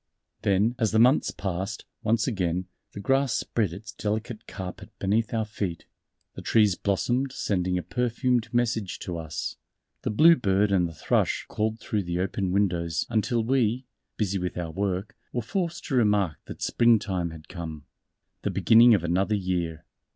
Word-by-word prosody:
Then 105 Hz, +2 st, +2 dB
as 110 Hz, -, +2 dB
the 110 Hz, -, +1 dB
months 125 Hz, +6 st, +5 dB
passed, 95 Hz, +1 st, -4 dB, 0.2 s
once 110 Hz, 0 st, +2 dB
again, 90 Hz, -6 st, -1 dB, 0.3 s
the -, -, -7 dB
grass 135 Hz, +4 st, +2 dB
spread 105 Hz, -7 st, 0 dB
its 105 Hz, +5 st, -8 dB
delicate 110 Hz, +2 st, -4 dB
carpet 95 Hz, -2 st, -7 dB
beneath 105 Hz, +3 st, +1 dB
our 110 Hz, -2 st, 0 dB
feet, 100 Hz, -5 st, -4 dB, 0.5 s
the -, -, -8 dB
trees 105 Hz, -4 st, +4 dB
blossomed 120 Hz, +9 st, 0 dB
sending 90 Hz, -7 st, -1 dB
a 90 Hz, -, -2 dB
perfumed 120 Hz, -, 0 dB
message 115 Hz, -5 st, 0 dB
to 85 Hz, -2 st, -4 dB
us, 80 Hz, -2 st, -5 dB, 0.4 s
the -, -, -2 dB
bluebird 105 Hz, -, +4 dB
and 90 Hz, -3 st, +3 dB
the 80 Hz, -, -10 dB
thrush 75 Hz, -, 0 dB
called 110 Hz, +1 st, -2 dB
through 105 Hz, -1 st, -1 dB
the 85 Hz, -2 st, -3 dB
open 95 Hz, 0 st, -1 dB
windows 85 Hz, -5 st, +1 dB
until 115 Hz, +1 st, +1 dB
we, 125 Hz, 0 st, +1 dB, 0.3 s
busy 100 Hz, -2 st, 0 dB
with 90 Hz, 0 st, -3 dB
our 85 Hz, -2 st, -3 dB
work, 95 Hz, +2 st, -2 dB, 0.2 s
were 120 Hz, -, 0 dB
forced 170 Hz, -, -3 dB
to 135 Hz, -, -2 dB
remark 105 Hz, -, +2 dB
that -, -, -7 dB
Spring 115 Hz, -1 st, +4 dB
time 95 Hz, -6 st, -2 dB
had 80 Hz, -1 st, -11 dB
come 80 Hz, -5 st, -7 dB, 0.6 s
the -, -, -1 dB
beginning 115 Hz, +1 st, +6 dB
of 95 Hz, -, -1 dB
another 95 Hz, +5 st, +1 dB
year.... 90 Hz, -5 st, -2 dB
100 Hz, 165 wpm, -26 LUFS, 90-115 Hz, 0.6 s, beginning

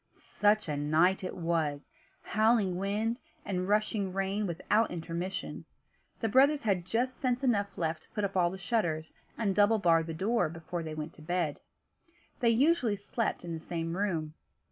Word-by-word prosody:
Such 210 Hz, -1 st, +1 dB
a 150 Hz, -, -1 dB
night 155 Hz, +6 st, +3 dB
as -, -, -1 dB
it -, -, -7 dB
was! 160 Hz, -4 st, -1 dB, 0.3 s
Howling 215 Hz, -4 st, +2 dB
wind, 210 Hz, +5 st, -1 dB, 0.3 s
and 185 Hz, -2 st, -2 dB
rushing 210 Hz, -1 st, +1 dB
rain, 195 Hz, +2 st, -1 dB
without 210 Hz, +6 st, +1 dB
intermission. 175 Hz, +2 st, -4 dB, 0.6 s
The 225 Hz, -, +1 dB
brothers 275 Hz, +6 st, +4 dB
had 190 Hz, -5 st, +1 dB
just 245 Hz, +6 st, -1 dB
sense 255 Hz, -1 st, 0 dB
enough 205 Hz, -6 st, +1 dB
left 160 Hz, -1 st, -1 dB
to -, -, -25 dB
put 210 Hz, -, -3 dB
up 195 Hz, -1 st, -2 dB
all 175 Hz, -2 st, +4 dB
the 190 Hz, -, -6 dB
shutters, 170 Hz, -7 st, -1 dB, 0.2 s
and 205 Hz, -4 st, +1 dB
double 210 Hz, +3 st, +4 dB
bar 170 Hz, -5 st, +4 dB
the 165 Hz, 0 st, -5 dB
door, 210 Hz, +2 st, +1 dB
before 165 Hz, +2 st, -5 dB
they 155 Hz, -1 st, -5 dB
went 155 Hz, +1 st, -5 dB
to -, -, -16 dB
bed. 170 Hz, -2 st, -1 dB, 0.8 s
They 235 Hz, -, +3 dB
usually 250 Hz, -2 st, +3 dB
slept 205 Hz, -1 st, -3 dB
in 170 Hz, -, -4 dB
the 165 Hz, -, -4 dB
same 165 Hz, 0 st, -4 dB
room. 170 Hz, -6 st, -1 dB
190 Hz, 175 wpm, -30 LUFS, 165-215 Hz, 0.8 s, brothers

